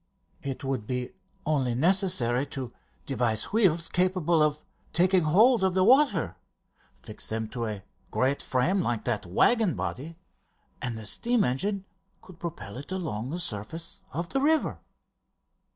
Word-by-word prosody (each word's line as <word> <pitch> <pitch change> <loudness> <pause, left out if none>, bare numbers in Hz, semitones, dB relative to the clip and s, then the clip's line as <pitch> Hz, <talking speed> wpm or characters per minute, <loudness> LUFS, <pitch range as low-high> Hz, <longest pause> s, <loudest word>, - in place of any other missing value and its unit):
"It 135 -1 -5
would 130 -6 -3
be 125 -1 -3 0.3
only 135 -6 +1
necessary 145 - +3
to 130 -3 -6 0.3
devise 120 - -1
wheels 170 -7 +3
capable 180 -3 +1
of 150 0 +1 0.3
taking 180 -1 +3
hold 220 +8 +5
of 190 -1 +1
the 185 - +4
water. 205 - +3 0.7
Fix - - -1
them 110 0 -2
to 115 -1 -3
a 105 -3 -5 0.3
great 135 +2 0
frame 170 +10 +1
like 120 -9 -1
that 110 -7 -2
waggon 205 - +3
body 160 +5 -5 0.6
and 120 -2 -3
the 110 - -8
steam 235 - +2
engine 195 +11 -1 0.3
could 185 -3 -16
propel 105 - -7
it 140 +7 -9
along 155 - -3
the 170 +5 -4
surface 165 - -3
of 170 +1 -4
the 270 - 0
river!" 315 +2 +2
155 Hz, 145 wpm, -27 LUFS, 125-185 Hz, 0.7 s, hold